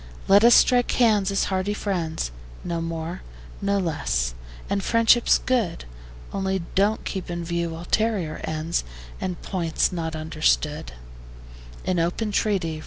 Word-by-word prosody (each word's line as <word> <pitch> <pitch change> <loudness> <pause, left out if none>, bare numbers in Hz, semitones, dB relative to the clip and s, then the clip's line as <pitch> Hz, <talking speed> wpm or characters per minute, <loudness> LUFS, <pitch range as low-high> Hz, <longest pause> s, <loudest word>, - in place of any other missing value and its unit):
Let 200 +2 +6
us 235 +1 +8
strike 245 -1 +4
hands 215 -5 +3
as 195 - +1
hearty 190 +2 0
friends; 165 - -2 0.3
No 170 -1 -2
more, 165 +1 -4 0.4
no 200 0 +1
less: 140 - -1 0.3
and 200 -1 -1
friendship's 230 +2 +4
good: 230 - -1 0.5
Only 190 -2 -1
don't 205 +3 +1
keep 190 -3 -4
in 170 -1 -4
view 170 -1 -2
ulterior 180 -2 -1
ends, 160 +2 -1 0.4
And 180 -2 -3
points 170 -4 0
not 165 -3 -3
understood 60 - 0 0.9
In 180 -2 +1
open 180 +6 -1
treaty. 185 -7 0
180 Hz, 130 wpm, -24 LUFS, 165-200 Hz, 0.9 s, us